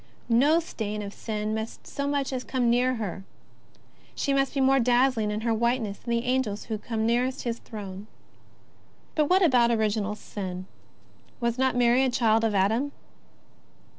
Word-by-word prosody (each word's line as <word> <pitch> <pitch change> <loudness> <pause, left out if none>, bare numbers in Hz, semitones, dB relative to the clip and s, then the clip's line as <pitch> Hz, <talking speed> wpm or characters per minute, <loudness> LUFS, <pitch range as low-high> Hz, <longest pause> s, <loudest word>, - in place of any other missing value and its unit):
No 285 +8 +4
stain 215 -10 -4
of 200 0 -7
sin 215 -1 -3
must 220 +1 -5
so 280 0 -4
much 280 -1 -1
as 255 -1 -3
come 250 -3 +1
near 250 +2 +2
her. 200 -4 -5 0.9
She 280 - 0
must 275 +1 +1
be - - +1
more 270 0 +4
dazzling 245 -2 +2
in 210 +1 -2
her 230 0 +1
whiteness 230 -2 0
than - - -9
the 235 0 +1
Angels 250 -5 0
who 220 -2 -4
come 220 0 -2
nearest 250 +3 0
His 235 -1 -3
throne. 200 -2 -8 1.1
But 305 -2 +1
what 375 +1 +5
about 250 -7 +4
original 215 -2 0
sin? 185 -3 -6 0.7
was 235 +1 -1
not 260 -1 +2
Mary 245 +1 +4
a 265 - +2
child 225 -3 +2
of 220 -2 +1
Adam 220 +9 +2
235 Hz, 165 wpm, -26 LUFS, 215-260 Hz, 1.1 s, what